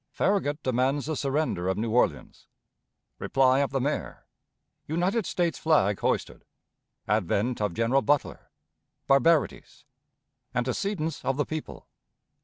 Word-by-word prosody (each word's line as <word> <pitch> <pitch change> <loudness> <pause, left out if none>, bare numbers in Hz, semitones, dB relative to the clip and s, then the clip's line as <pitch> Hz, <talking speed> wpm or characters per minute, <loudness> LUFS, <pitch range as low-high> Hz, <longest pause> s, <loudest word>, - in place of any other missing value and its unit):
Farragut 155 -7 0
demands 130 +2 0
the 155 +1 -2
Surrender 140 - -1
of 95 0 0
New 110 +1 -2
Orleans. 125 - 0 0.7
Reply 130 0 +3
of 140 - +1
the 135 - -1
Mayor. 145 +4 -3 0.6
United 180 +6 0
States 175 -4 -1
Flag 105 -12 +2
hoisted. - - -2 0.6
Advent 105 +4 0
of 105 -5 -1
General 120 +4 +2
Butler. 145 0 -1 0.6
Barbarities. 145 0 +1 0.7
Antecedents 155 - -2
of 135 0 -1
the 145 - +1
People. 155 -1 -7
140 Hz, 115 wpm, -27 LUFS, 125-155 Hz, 0.7 s, Reply